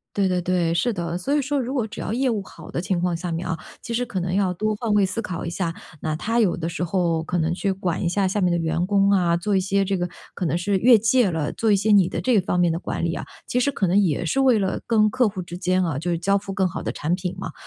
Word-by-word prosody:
对 200 -1 +2
对 180 -1 +1
对， 175 -2 0
是 240 +8 +1
的， 170 -4 -3
所 275 +10 -1
以 295 - +2
说 285 +1 -1
如 255 +2 -3
果 245 -5 0
只 220 +1 -8
要 - - -3
业 260 +3 +1
务 215 -4 -1
好 - - -12
的 - - -2
情 180 0 -1
况 175 -1 0
下 175 +1 -5
面 165 +2 -3
啊， 165 -2 -1 0.3
其 - - -6
实 245 +2 +1
可 210 -5 -4
能 180 +1 -2
要 190 -2 +2
多 215 +4 -1
换 225 0 -2
位 205 -1 +4
思 190 +4 -3
考 180 -5 -5
一 170 - -3
下， 170 -1 -2 0.3
那 155 -1 -2
他 230 +8 0
有 200 -6 +2
的 165 -1 -3
时 170 - -4
候 170 -2 0
可 175 +2 -2
能 165 0 +1
去 195 +2 -1
管 185 -2 -2
一 175 - +1
下 195 +3 +1
下 195 +3 0
面 180 -2 +2
的 175 - +2
员 165 +1 0
工 200 0 +3
啊， 175 -4 +3
做 195 +4 0
一 - - +3
些 195 +1 +1
这 195 0 0
个 175 0 -1 0.3
可 185 - -3
能 165 - 0
是 195 +3 0
越 240 +3 +6
界 225 0 +3
了， 160 -3 -2
做 225 - 0
一 205 - +5
些 210 +3 0
你 195 -4 +5
的 - - -3
这 245 -5 +3
方 180 -1 -1
面 175 -2 +3
的 165 - -2
管 170 - -3
理 170 -1 0
啊， - - -5 0.2
其 250 - 0
实 280 - +2
可 200 -8 -1
能 185 +3 +3
也 175 -6 +1
是 270 +11 0
为 255 -4 +4
了 190 -2 -1
跟 215 -2 +4
客 245 +1 +2
户 195 -2 -5
之 175 0 -8
间 185 0 +1
啊， 160 -6 -2
就 170 +4 -2
是 170 - 0
交 195 +4 +2
付 195 0 -7
更 190 -1 +1
好 180 - -4
的 - - -2
产 160 +4 -1
品 180 -1 -3
嘛。 160 - -5
185 Hz, 335 characters per minute, -23 LUFS, 175-210 Hz, 0.3 s, 越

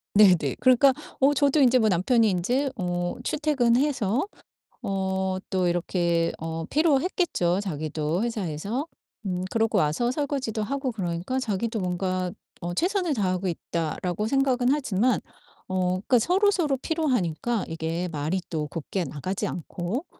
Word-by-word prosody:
네네. 180 -9 +5
그러니까 255 +1 +5 0.3
어 275 +2 +5
저도 285 +1 +3
인제 255 -2 +6
뭐 220 -1 +3
남편이 220 +6 +3
인제 245 +10 0
어 175 -1 -2
출퇴근해서 275 - +1 0.6
어 190 -1 -1 0.3
또 185 -2 +1
이렇게 170 -1 +1
어 165 0 -4
피로했겠죠 295 - +2
자기도 155 0 -2
회사에서. 215 - -3 0.4
음 180 -1 -2
그러고 225 -1 +1
와서 155 +11 +1
설거지도 260 -6 -2
하고 270 +2 -2
그러니까 180 +3 -3
자기도 225 -1 -2
뭔가 185 0 -1 0.3
어 175 0 -3
'최선을 360 - +1
다하고 185 -4 0
있다.'라고 170 +3 -2
생각은 260 -1 +2
하지만 250 -5 +1 0.5
어 185 -1 0
그러니까 195 +7 +2
서로서로 355 - +2
피로하니까 240 - -1
이게 165 +2 -3
말이 160 +4 -2
또 155 -3 -2
곱게 165 +5 -3
나가지 175 +5 -3
않고 180 - -4
200 Hz, 310 characters per minute, -26 LUFS, 175-260 Hz, 0.6 s, 인제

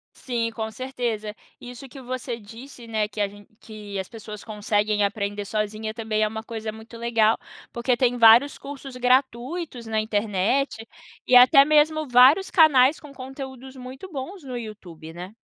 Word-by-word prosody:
Sim, 235 -3 -2
com 220 -1 -4
certeza. 235 -4 -4 0.3
Isso 245 +2 -10
que 270 +1 -12
você 250 -1 -5
disse, 235 +3 -12
né, 215 -2 -1
que 210 0 -5
a 205 - +2 0.3
que 210 -2 -8
as 190 - -5
pessoas 215 -2 -9
conseguem 210 -1 0
aprender 205 0 -3
sozinha 215 +1 -3
também 220 -1 -1
é - - +2
uma 220 +1 -6
coisa 225 -1 -5
muito 220 +2 -12
legal, 230 -1 +2 0.3
porque 240 +1 0
tem 245 0 +1
vários 235 +5 +6
cursos 275 -2 -9
gratuitos 255 +2 0
na 220 -1 -1
internet, 220 +3 -1 0.4
e 250 - +4
até 255 +3 +8
mesmo 305 +1 +2
vários 260 +10 +6
canais 295 -4 +5
com 295 -3 -13
conteúdos 265 0 -9
muito 260 +8 -10
bons 305 +6 -7
no 255 -2 -6
YouTube, 180 -8 -10
né? 180 +4 -9
235 Hz, 160 wpm, -24 LUFS, 215-265 Hz, 0.4 s, até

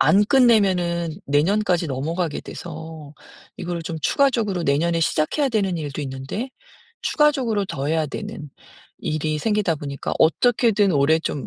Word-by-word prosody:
안 200 +1 +5
끝내면은 190 - +3
내년까지 175 +4 +2
넘어가게 155 +4 -2
돼서 160 -2 -9 0.4
이거를 175 -1 -4
좀 160 0 -5
추가적으로 225 -10 +1
내년에 165 +4 +1
시작해야 165 - +1
되는 200 -7 0
일도 145 -2 -5
있는데 135 - -5 0.5
추가적으로 265 -9 +2
더 140 -5 -4
해야 160 0 +1
되는 145 0 -7 0.5
일이 155 0 -2
생기다 210 -2 +1
보니까 140 -1 -5
어떻게든 220 +2 +3
올해 145 +2 +3
좀 145 -5 -4
170 Hz, 330 characters per minute, -22 LUFS, 150-210 Hz, 0.5 s, 안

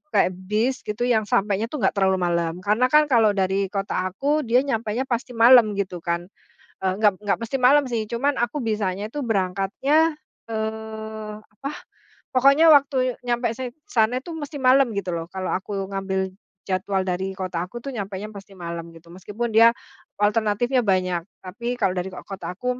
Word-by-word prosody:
kayak 185 - +4 0.2
bis, 225 +6 0
gitu 210 +3 -2
yang 225 -4 +2
sampainya 205 +2 +1
tuh 265 -2 -5
enggak 190 - +4
terlalu 190 0 +3
malam. 170 -2 0
Karena 215 +6 +3
kan, 300 +1 +4
kalau 220 -4 +4
dari 195 0 +1
kota 195 -1 -2
aku, 280 +11 0
dia 245 +3 +4
nyampenya 230 -3 -1
pasti 250 -1 -3
malam, 230 -2 +7
gitu 190 -3 -3
kan. 170 +2 -3 0.5
Eee, 190 - +2
enggak 210 -3 +4
enggak 205 -1 +1
mesti 230 +3 -4
malam 270 +3 +5
sih, 230 -3 -1
cuman 275 +5 +1
aku 240 +5 -1
bisanya 210 -4 -2
itu 285 +6 -5
berangkatnya, 225 - +1 0.3
eee, 220 -1 -5
apa, 215 +6 -8 0.6
pokoknya 275 +5 +6
waktu 265 -3 +3
nyampe 240 0 0
san 255 0 -5 0.2
sana 235 +2 +2
itu, 340 - -8
mesti 295 -1 -6
malam, 260 -1 +4
gitu 190 -2 -2
lho. 165 0 -4
Kalau 190 -1 -3
aku 195 +1 -4
ngambil 190 -1 -2 0.3
jadwal 190 +1 0
dari 185 +1 -2
kota 180 -3 -3
aku 240 +6 -9
tuh, 275 - -5
nyampenya 200 -1 -5
pasti 195 0 -11
malam, 170 -1 -6
gitu. 165 +1 -16
Meskipun, 205 +6 -4
dia 230 +1 +8 0.5
alternatifnya 220 +4 +2
banyak. 185 -3 +1 0.2
Tapi, 235 +7 -4
kalau 195 -3 +2
dari 180 +1 -2
kot - - -9
kota 195 -2 -6
aku 250 +6 -3
215 Hz, 175 wpm, -23 LUFS, 190-250 Hz, 0.6 s, dia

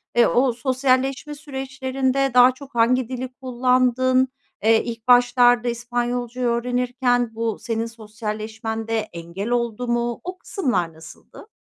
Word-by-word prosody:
eee, 240 - +5
o 250 0 +2
sosyalleşme 260 +3 0
süreçlerinde 270 -1 -2
daha 250 +1 +7
çok 275 0 -14
hangi 240 +1 +2
dili 255 0 -5
kullandın? 255 0 +2 0.4
Eee, 220 +1 +4
ilk 230 -1 -7
başlarda 245 0 +5
İspanyolca'yı 240 +1 -2
öğrenirken 245 0 0
bu 225 -1 -2
senin 230 -2 -2
sosyalleşmende 220 0 -5 0.2
engel 170 +5 -6
oldu 240 0 -1
mu? 240 0 -1
O 365 +1 -6
kısımlar 200 - -2
nasıldı? 160 0 -14
245 Hz, 120 wpm, -22 LUFS, 230-255 Hz, 0.4 s, daha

